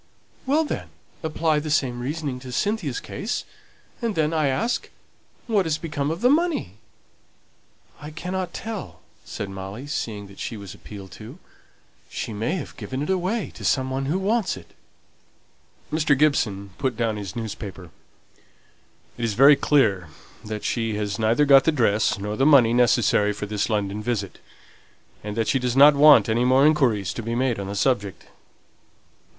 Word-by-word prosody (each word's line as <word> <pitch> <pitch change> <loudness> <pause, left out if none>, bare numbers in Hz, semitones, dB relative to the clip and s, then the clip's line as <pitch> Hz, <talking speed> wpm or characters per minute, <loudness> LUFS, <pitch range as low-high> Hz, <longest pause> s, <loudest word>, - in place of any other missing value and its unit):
"Well, 300 +4 +3
then, - - -5 0.3
apply 160 -1 0
the 155 +1 -5
same 130 -5 0
reasoning 140 0 -4
to 125 0 -9
Cynthia's 175 - -1
case; 215 +4 -4 0.6
and 230 -3 -1
then, 155 0 +1
I 155 -3 +1
ask, 140 - -1 0.6
what 205 -6 +1
has 155 -1 0
become 150 -4 -3
of 165 +4 -4
the 245 - +4
money?" 305 - 0 1.2
"I 150 - -8
cannot 180 +3 -4
tell," 220 +1 -7 0.2
said 100 - -5
Molly, 95 +6 -7
seeing 110 -8 -4
that 100 0 -15
she 115 - -5
was 100 -2 -9
appealed 100 -3 -11
to. 115 - -11 0.7
"She 110 - -5
may 115 - -1
have 170 - -6
given 130 +2 -4
it 150 - -2
away 190 +4 -1
to - - -11
some 130 -1 +1
one 135 +1 -2
who 160 +6 0
wants 200 - 0
it." 85 -3 -15 1.2
Mr. 150 -3 +2
Gibson 105 -10 +1
put 130 -4 -1
down 115 -2 -1
his 100 -3 -7
newspaper. 100 -6 -7 1.3
"It's 115 -2 -1
very 140 +7 +7
clear 105 - +2 0.4
that 105 -1 -6
she 115 -3 -1
has 105 0 -3
neither 115 +6 +3
got 135 -1 +6
the 160 - +4
dress 110 -9 +1
nor 105 +1 -4
the 135 - 0
money 130 -6 +6
necessary 120 -4 +3
for 105 - -5
this 105 +1 -2
London 105 -1 -1
visit, 105 -4 -3 0.8
and 105 +1 -6
that 115 - 0
she 135 - +2
doesn't 135 +4 +5
want 145 -1 +7
any 115 +2 +1
more 130 +3 +4
inquiries 120 - +2
to - - -5
be 115 +1 -3
made 125 -3 0
on 100 - -5
the 100 - -5
subject. 100 -3 -1
125 Hz, 165 wpm, -23 LUFS, 105-155 Hz, 1.3 s, very